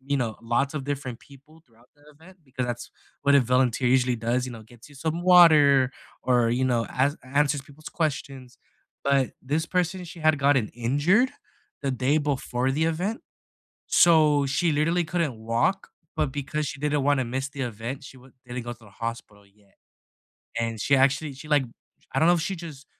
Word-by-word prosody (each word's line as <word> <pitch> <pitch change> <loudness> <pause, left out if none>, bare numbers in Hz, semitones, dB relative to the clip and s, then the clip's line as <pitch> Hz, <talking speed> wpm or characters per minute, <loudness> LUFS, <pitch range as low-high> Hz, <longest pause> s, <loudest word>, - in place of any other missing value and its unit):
you 140 +2 -2
know, 120 -5 -2
lots 125 +5 0
of 140 -3 -4
different 135 -4 -4
people 145 +3 -18
throughout 115 0 -26
the 145 - -26
event 180 +5 -17
because 130 -2 -4
that's 120 -1 -5 0.3
what 140 0 +4
a 140 - +7
volunteer 125 0 +1
usually 125 -1 +3
does, 120 +3 -1
you 125 - -7
know, 115 -2 -10
gets 115 +3 -17
you 145 - -17
some 160 +4 -3
water 150 -7 +6 0.3
or, 120 -2 +2
you 125 +2 +1
know, 120 -3 +1
ans 140 +4 0
answers 145 +2 +1
people's 145 +2 -13
questions, 135 -5 -3 0.5
but 140 -2 +2
this 150 +5 -1
person, 180 +1 -1
she 170 0 -11
had 155 -2 +3
gotten 135 -5 +2
injured 145 - +2 0.5
the 140 - 0
day 130 +3 +1
before 135 -3 -1
the 155 +3 0
event, 180 +8 -2 0.7
so 155 -4 +5
she 165 +5 +1
literally 165 +4 +1
couldn't 165 -5 -1
walk, 115 +12 -1 0.3
but 150 -3 0
because 145 +1 -3
she 140 - -7
didn't 150 -1 0
wanna 140 -1 +2
miss 130 +3 -3
the 140 -1 -5
event, 120 +3 -5
she 135 - -12
w 130 +1 -18
didn't 125 0 -5
go 120 - -5
to 115 -1 -15
the 105 - -16
hospital 105 -3 -6
yet 100 0 -29 0.9
and 115 -1 -3
she 140 - +2
actually, 140 +2 +2
she 145 +3 -12
like 145 -3 +3 0.5
I - - +2
don't 160 - +4
know 175 - +6
if 170 - 0
she, 190 +4 -2
just 155 -5 -10
140 Hz, 190 wpm, -25 LUFS, 125-155 Hz, 0.9 s, a